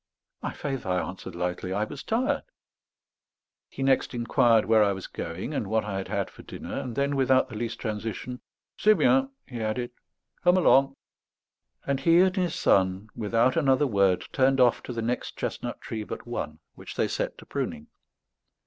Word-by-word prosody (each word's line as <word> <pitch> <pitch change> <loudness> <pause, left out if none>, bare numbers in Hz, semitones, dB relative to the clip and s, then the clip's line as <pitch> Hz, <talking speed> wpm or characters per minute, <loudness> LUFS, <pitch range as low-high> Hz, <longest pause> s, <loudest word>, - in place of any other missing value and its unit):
"My - - -3
faith," 135 -3 -4
I 90 -1 +1
answered 95 -1 -6
lightly, 90 +1 -2
"I 105 +2 0
was 140 +6 -6
tired." 240 +4 0 1.3
He 135 - -5
next 135 -1 +2
inquired 115 -1 +3
where 110 -1 +5
I 100 -1 +2
was 95 -1 -7
going, 85 - -5
and 110 - -2
what 110 +1 +1
I 100 -2 -3
had 95 - -5
had - - -2
for - - -13
dinner; - - -8
and 120 -3 -5
then, 140 +2 +1
without 130 -1 +3
the - - -8
least 115 +1 -3
transition, 110 +3 -4 0.4
"C'est 215 0 +6
bien," 265 - +4 0.2
he 120 -3 -6
added, 120 +3 -2 0.5
"come 180 0 +5
along." 135 -6 +4 0.9
And 140 -1 0
he 165 +5 +5
and 185 0 +3
his 180 -4 0
son, 95 +2 +2
without 115 +3 +2
another 140 -2 +3
word, 100 -7 +2
turned 135 0 +3
oil 125 -1 +7
to - - -5
the 115 -1 -3
next 120 +2 -3
chestnut - - -4
tree 110 -1 -4
but - - -7
one, 80 -11 -4 0.2
which - - -10
they - - +1
set - - -3
to - - -13
pruning. 75 - -4
120 Hz, 180 wpm, -27 LUFS, 105-135 Hz, 1.3 s, oil